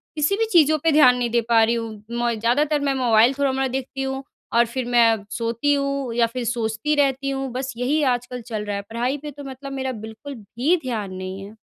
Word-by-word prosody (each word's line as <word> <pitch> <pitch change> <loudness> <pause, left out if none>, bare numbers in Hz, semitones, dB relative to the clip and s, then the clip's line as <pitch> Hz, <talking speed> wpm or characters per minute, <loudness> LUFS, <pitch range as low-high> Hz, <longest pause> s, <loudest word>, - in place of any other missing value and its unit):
किसी 300 +5 +1
भी 450 - +2
चीज़ों 310 -4 +5
पे 325 - +4
ध्यान 255 -5 +6
नहीं 240 -1 -1
दे 235 0 +2
पा 225 -1 +5
रही 230 +1 +2
हूँ। 225 -3 -5
मैं 235 -1 -1
ज़्यादातर 290 +7 +2
मैं 280 -1 +1
मोबाइल 240 -1 +4
थोड़ा-मोड़ा 270 -1 +1
देखती 265 +1 -4
हूँ 265 0 -3 0.3
और 235 +1 +5
फिर 245 +2 -4
मैं 230 -3 +3
सोती 235 +5 0
हूँ 275 -3 -1
या 235 -1 +4
फिर 245 +1 -5
सोचती 230 +4 -1
रहती 275 -1 +1
हूँ। 270 -1 -3
बस 260 0 -4
यही 270 +6 +1
आजकल 245 0 -7
चल 215 -3 -4
रहा 205 -1 -3
है। 200 - -3
पढ़ाई 245 +5 -1
पे 295 +1 -8
तो 285 +1 -10
मतलब 275 +1 -8
मेरा 265 -1 -2
बिल्कुल 220 +5 -8
भी 240 - 0
ध्यान 215 -7 -3
नहीं 185 +1 -6
है। 210 +2 -12
250 Hz, 220 wpm, -22 LUFS, 230-275 Hz, 0.3 s, ध्यान